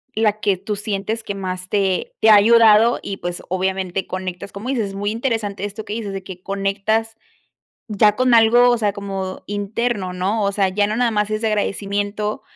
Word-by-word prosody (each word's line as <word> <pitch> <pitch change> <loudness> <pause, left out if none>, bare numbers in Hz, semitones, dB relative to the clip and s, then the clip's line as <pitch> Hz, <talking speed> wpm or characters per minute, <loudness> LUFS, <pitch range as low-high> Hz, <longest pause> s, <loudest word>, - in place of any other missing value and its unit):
la 215 -1 +1
que 200 -3 +1
tú 205 +3 -4
sientes 210 +2 -3
que 200 - -5
más 185 -1 -5
te 195 -3 0
te 220 - +4
ha - - +9
ayudado. 225 +1 +6
Y, 195 - -5
pues, 175 0 -5
obviamente, 190 0 -2
conectas, 185 +1 -5
como 215 +6 -7
dices, 225 -7 -1
es 195 - -9
muy 205 +1 -2
interesante 220 -4 -2
esto 210 +2 -7
que 205 - -5
dices, 210 -3 -4
de 195 -1 -5
que 185 -1 -10
conectas 200 +3 -1 0.7
ya 210 0 +3
con 255 0 +2
algo, 235 +2 +6
o 240 - +3
sea, 205 -3 0
como 195 -2 -5
interno, 205 -1 -2
¿no? 200 +4 -1
O 200 - +1
sea, 195 -2 +2
ya 205 +2 +1
no 215 - -2
nada 240 -1 +1
más 210 0 0
es 215 +1 -2
de 225 - +1
agradecimiento, 205 0 -2
205 Hz, 200 wpm, -20 LUFS, 195-220 Hz, 0.7 s, ha